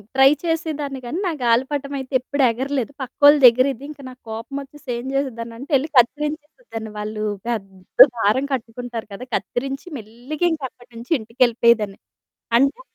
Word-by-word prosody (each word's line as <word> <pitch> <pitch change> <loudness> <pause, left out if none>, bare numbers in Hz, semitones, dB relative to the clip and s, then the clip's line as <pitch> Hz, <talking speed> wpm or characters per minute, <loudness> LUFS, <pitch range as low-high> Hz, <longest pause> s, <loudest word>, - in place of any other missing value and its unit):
Try 270 0 +7
చేసేదాన్ని 310 -4 -2
గానీ 280 +9 -3
నా 360 - +1
గాలిపటం 265 +4 +1
అయితే 265 +1 -8
ఎప్పుడు 280 +3 -1
ఎగరలేదు. 265 +2 -2
పక్కోళ్ళదెగిరేది 265 -1 +5
ఇంక 295 -2 -10
నాకు 255 0 -14
కోపమొచ్చేసి 275 +6 -7
ఏం 240 +1 -6
జేసేదాన్నంటే 245 0 -4
యెళ్లి 275 +4 +1
కత్తిరించేసేదాన్ని. 295 - -1
వాళ్ళు 215 0 -4 0.2
పెద్ద 195 -2 +4
దారం 225 +5 +2
కట్టుకుంటారు 235 -1 -5
గదా! 245 +6 -7
కత్తిరించి 270 +6 -4
మెల్లిగింకా 270 +8 -3
అక్కడి 245 0 -21
నుంచి 235 +5 -11
ఇంటికెళ్ళిపోయేదాన్ని. 230 -3 +2 0.6
అంటే 275 - +1
255 Hz, 125 wpm, -21 LUFS, 230-285 Hz, 0.6 s, Try